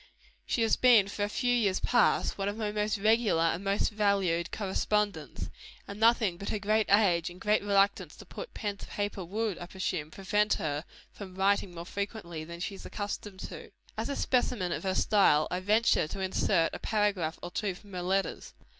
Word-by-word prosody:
She 230 - +1
has 225 - +3
been 235 -6 +6
for 205 - -3
a 205 - -1
few 245 +3 0
years 205 -6 +2
past, 240 -1 +2
one 195 0 -1
of 205 - -5
my 215 -2 -2
most 210 +1 0
regular 215 -4 +3
and 165 +3 0
most 200 +2 +1
valued 195 -5 +1
correspondents; 210 +1 -2 0.4
and 200 +1 -8
nothing 225 -5 +3
but 200 - -5
her - - -1
great 215 +1 +1
age 180 -5 +4
and 175 +1 -12
great 210 +3 +2
reluctance 200 0 +1
to - - -13
put - - -9
pen 205 -2 -3
to - - -10
paper, 205 -2 -3
would, 205 +2 -2
I 175 - -7
presume, 175 -5 -3
prevent 205 +5 +1
her 150 +1 -3 0.3
from 190 -3 -10
writing 195 -1 +1
more 170 0 -7
frequently 200 -5 -5
than 170 +2 -9
she 185 +4 -3
is 195 - -10
accustomed 205 -1 -5
to - - -7
do. - - -33 0.2
As - - -3
a 280 - -2
specimen 245 -10 0
of - - -2
her 190 -1 0
style, 175 -9 +4
I 180 - -1
venture 210 -3 +3
to 175 - -6
insert 185 -2 +1
a - - -5
paragraph 200 -7 0
or 175 - -5
two 200 -2 -2
from 200 +2 -15
her 180 - -3
letters. 190 +2 -2
200 Hz, 200 wpm, -30 LUFS, 180-210 Hz, 0.4 s, been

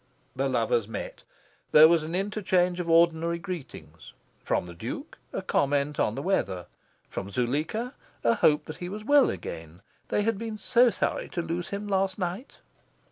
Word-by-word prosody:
The - - 0
lovers 475 -2 +1
met. - - -6 0.5
There 155 +1 +10
was 165 0 +4
an 160 +3 -4
interchange 185 -3 +1
of 170 -1 -3
ordinary 165 0 +3
greetings: 135 - -8 0.3
from - - 0
the 85 - -9
Duke, 85 - -7
a - - -4
comment 145 +1 +1
on 105 - +1
the 140 - -4
weather; 95 - 0 0.4
from 95 - -5
Zuleika, 150 - -1 0.3
a 115 - +4
hope 150 +4 +3
that 155 - -8
he 175 - -5
was 210 +2 -6
well 285 0 +5
again 80 +3 -7 0.2
they 205 - +1
had 225 -2 0
been 225 -1 -4
so 240 +4 +4
sorry 200 - -2
to 170 - -3
lose 175 +2 -3
him 200 +1 -5
last 195 -1 0
night. 185 +6 -4
175 Hz, 170 wpm, -27 LUFS, 145-205 Hz, 0.5 s, There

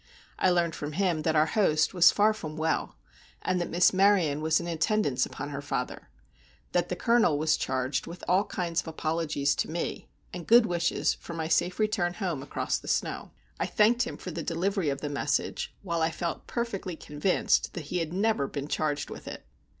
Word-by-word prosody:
I 185 - +4
learned 175 -2 +2
from 150 0 -5
him 175 -2 +1
that 160 +1 0
our 155 0 +5
host 155 -5 +2
was 175 -2 +7
far 210 +1 +3
from 160 -7 -7
well, 160 +1 -1 0.5
and 185 -1 0
that 175 - -3
Miss 175 +2 +4
Maryon 185 -7 +3
was 160 0 +2
in 170 - -5
attendance 165 - +1
upon 145 +1 -6
her 140 -1 -5
father; 140 - -4 0.6
that 175 0 +1
the 180 - -1
Colonel 225 -6 +3
was 155 +1 +2
charged 130 +1 -2
with 170 +2 -9
all 190 +3 +3
kinds 175 -4 -2
of - - -16
apologies 155 -3 0
to - - -1
me, 165 +2 -4 0.2
and 175 -2 -7
good 235 0 +7
wishes 170 -2 +1
for 170 - -9
my 160 -1 -2
safe 175 +2 +1
return 210 -5 0
home 175 -9 -2
across 140 - -2
the - - -13
snow. - - -1 0.3
I - - 0
thanked 230 +3 +3
him 245 - -2
for 180 - -7
the 165 - -4
delivery 175 +1 -1
of 140 0 -3
the 150 - -2
message, 145 0 -1
while 170 -3 -1
I 160 - +3
felt 170 0 -4
perfectly 205 -7 -3
convinced 180 +9 0
that 175 - -3
he 180 - 0
had 165 -2 -3
never 195 -6 +1
been 140 0 -5
charged 150 -1 -1
with - - -9
it. - - -8
170 Hz, 200 wpm, -28 LUFS, 155-190 Hz, 0.6 s, was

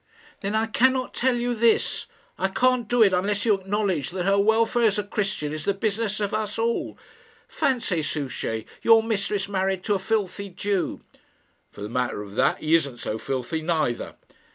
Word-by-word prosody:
"Then 200 +2 -2
I 220 +1 +2
cannot 255 +3 +2
tell 255 0 +1
you 240 0 -1
this. 230 0 +2 0.3
I - - +2
can't 250 +3 +1
do 240 0 +4
it 195 -3 +4
unless 200 +4 0
you 220 - +5
acknowledge 195 -6 -1
that 180 0 -3
her 200 +1 +3
welfare 225 +3 +3
as 210 -1 +1
a 210 - 0
Christian 195 -7 -2
is 155 -1 -5
the 200 - +1
business 210 0 -1
of 205 -1 -2
us 215 -1 -2
all. 230 +1 -1 0.5
Fancy, 230 -10 0
Souchey, 140 -7 -3 0.2
your 225 -1 +6
mistress 205 -3 -1
married 190 -1 -1
to 210 - +1
a 195 - 0
filthy 200 -1 -2
Jew!" 190 +1 -2 0.7
"For - - -13
the 105 - -4
matter 125 -3 -2
of 100 -1 -11
that, - - +2
he 155 +1 -1
isn't 140 -7 +2
so 110 -1 -4
filthy 135 +7 -3
neither." 155 -7 -1
200 Hz, 180 wpm, -25 LUFS, 165-225 Hz, 0.7 s, your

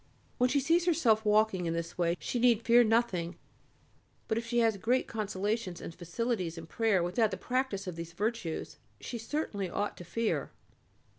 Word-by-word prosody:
When 250 +1 +4
she 280 +3 +3
sees 335 +6 +2
herself 240 -11 +3
walking 210 -4 +3
in 165 - -1
this 170 0 -4
way 170 0 +1
she 245 - -2
need 235 -2 +4
fear 240 +1 +6
nothing, 215 -7 +1 0.9
but 220 - 0
if 230 0 -3
she 240 +1 -1
has 225 -3 +3
great 245 +6 +1
consolations 210 -2 -2
and - - -7
facilities 180 0 -2
in 165 - -7
prayer 205 0 +1
without 200 +6 +2
the - - -4
practice 250 -6 -1
of 180 -3 -5
these 170 0 -7
virtues, 210 -3 -3 0.2
she 240 - -6
certainly 225 - -3
ought 205 +4 -2
to - - -8
fear. 230 +6 -1
220 Hz, 175 wpm, -31 LUFS, 180-235 Hz, 0.9 s, fear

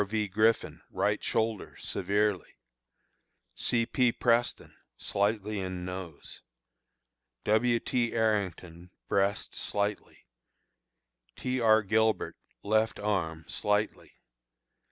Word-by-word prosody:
V. 105 +1 -1
Griffin, 110 +3 +1
right - - 0
shoulder 110 -2 -1
severely; 105 -2 -1 1.0
C. 115 -1 +1
P. 125 0 +2
Preston, 120 0 0 0.2
slightly 105 +1 -1
in 95 -1 -4
nose; 90 -4 -7 1.0
W. 115 +3 +3
T. 120 0 0
Arrington, 95 -6 -1 0.2
breast 100 0 0
slightly; 105 0 -3 1.1
T. 130 0 -2
R. 110 -1 +5
Gilbert, 110 +2 +1 0.3
left 110 +2 +2
arm 85 -6 -1
slightly. 105 +1 -1
105 Hz, 90 wpm, -29 LUFS, 95-110 Hz, 1.1 s, R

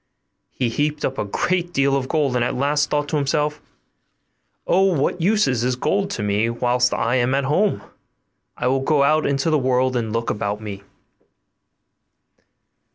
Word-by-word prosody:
He 125 -3 -2
heaped 150 +5 -1
up 135 - -3
a - - -1
great 175 - -1
deal 140 0 +2
of 135 -1 -1
gold, 145 -4 0
and 120 - +2
at - - -1
last 145 +3 +1
thought 145 -1 0
to 155 - 0
himself, 150 +1 -1 1.0
'Of 190 -2 +3
what 155 +5 -1
use 210 +4 +3
is 125 -3 0
this 125 +1 0
gold 195 +9 0
to - - -3
me 105 +2 +1
whilst 125 +1 +1
I 120 +3 0
am 125 +2 +1
at 140 - 0
home? 185 +9 +1 0.7
I - - -3
will 130 +2 +2
go 140 +1 +2
out 155 +2 +2
into 140 +3 0
the 155 - +3
world 130 0 +1
and 115 -3 -2
look 115 +1 -1
about 105 0 -3
me. 100 -2 -7
135 Hz, 175 wpm, -21 LUFS, 120-150 Hz, 1.0 s, Of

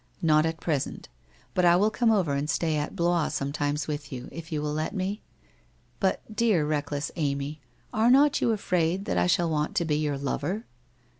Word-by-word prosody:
' - - -37
' - - -34
Not 155 +1 +4
at 160 0 -4
present. 150 -5 -2 0.4
But 180 - +1
I 175 0 +6
will 205 +4 +3
come 240 0 +2
over 185 -9 +2
and 140 +2 -1
stay 160 -2 +1
at 150 +4 -2
Blois 170 -3 +2
sometimes 145 +1 -1
with 150 -1 -4
you, 125 -1 -6
if 165 0 -9
you 155 - -1
will 150 0 -2
let 155 +7 -2
me?... 195 +2 -2 0.8
But, 190 -2 +1
dear, 210 -9 +3
reckless 145 -1 -2
Amy, 145 -1 -2 0.3
are 220 +2 +3
not 280 +3 +5
you 235 - +3
afraid 185 -3 0
that 90 - 0
I 90 - +2
shall 170 - +2
want 155 +6 -1
to 175 -4 +1
be 150 -2 +1
your 150 -2 -1
lover? 145 - -2
160 Hz, 205 wpm, -27 LUFS, 145-185 Hz, 0.8 s, I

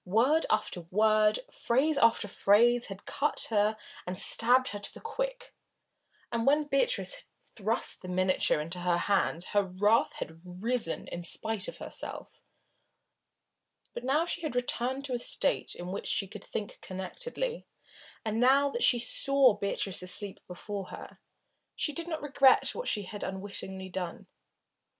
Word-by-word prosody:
Word 245 - +2
after 215 -4 0
word, 215 - +3
phrase 280 +5 +1
after 225 -2 +3
phrase 235 +5 +3
had 195 0 -9
cut 295 +2 +1
her 210 0 +2 0.3
and 180 0 -4
stabbed 250 +6 +3
her 205 - -5
to - - -4
the - - -12
quick, - - -4 0.8
and 230 +1 -1
when 295 +2 +4
Beatrice 290 - 0
had - - -17 0.2
thrust 220 +2 0
the 185 - -9
miniature 185 -3 +1
into 165 +4 -5
her 175 -1 +1
hands 185 -2 0
her 205 - +5
wrath 200 +4 +2
had 160 +1 -7
risen 185 +2 -2
in 175 - -5
spite 200 +4 0
of - - -7
herself. - - -7 1.5
But - - -6
now 270 +5 +2
that 340 - -2
she - - -3
had 310 -6 -4
returned 250 +2 -1
to 265 - -4
a 245 - -1
state - - 0
in 175 +1 -6
which 200 - -5
she 195 - 0
could 195 +1 -10
think 205 -2 -5
connectedly, 480 - -5 0.6
and 220 +1 -1
now 275 +3 +4
that 475 - -3
she 245 - +6
saw 265 +1 +4
Beatrice 200 -2 -1
asleep 190 +2 +2
before 195 +2 -6
her, - - -10 0.6
she 300 - -1
did 335 +2 -3
not 315 -3 -4
regret 275 -2 +4
what - - -5
she 210 - 0
had 205 +2 -7
unwittingly 190 -1 -4
done. 180 -2 -5
215 Hz, 160 wpm, -30 LUFS, 190-270 Hz, 1.5 s, she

